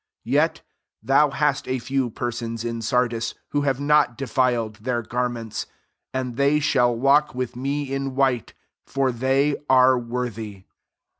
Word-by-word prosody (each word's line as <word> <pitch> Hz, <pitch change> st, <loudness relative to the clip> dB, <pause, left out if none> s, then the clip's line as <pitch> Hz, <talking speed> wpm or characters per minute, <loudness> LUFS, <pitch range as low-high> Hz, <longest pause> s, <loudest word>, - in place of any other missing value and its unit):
4 -, -, -8 dB
Yet -, -, +2 dB, 0.4 s
thou 140 Hz, +2 st, +4 dB
hast 145 Hz, 0 st, 0 dB
a 130 Hz, -, 0 dB
few 130 Hz, +1 st, -1 dB
persons 115 Hz, -1 st, -4 dB
in 115 Hz, 0 st, -3 dB
Sardi39 115 Hz, 0 st, 0 dB, 0.2 s
who 145 Hz, -, 0 dB
have, 135 Hz, -2 st, 0 dB
not 145 Hz, -4 st, +3 dB
defiled 125 Hz, -5 st, 0 dB
their 120 Hz, +2 st, -2 dB
gar 125 Hz, +2 st, -1 dB
ments: 115 Hz, -3 st, -5 dB, 0.4 s
and 125 Hz, -2 st, -3 dB
they 140 Hz, +2 st, +3 dB
shall 120 Hz, -5 st, +2 dB
walk 140 Hz, +4 st, +3 dB
with 125 Hz, -1 st, -3 dB
me 135 Hz, +2 st, -2 dB
in 135 Hz, -1 st, -3 dB
white; 130 Hz, -4 st, 0 dB, 0.3 s
for 135 Hz, -1 st, 0 dB
they 135 Hz, +4 st, +1 dB
are 130 Hz, -1 st, +5 dB
worthy. 115 Hz, -5 st, -5 dB
125 Hz, 150 wpm, -23 LUFS, 120-135 Hz, 0.4 s, are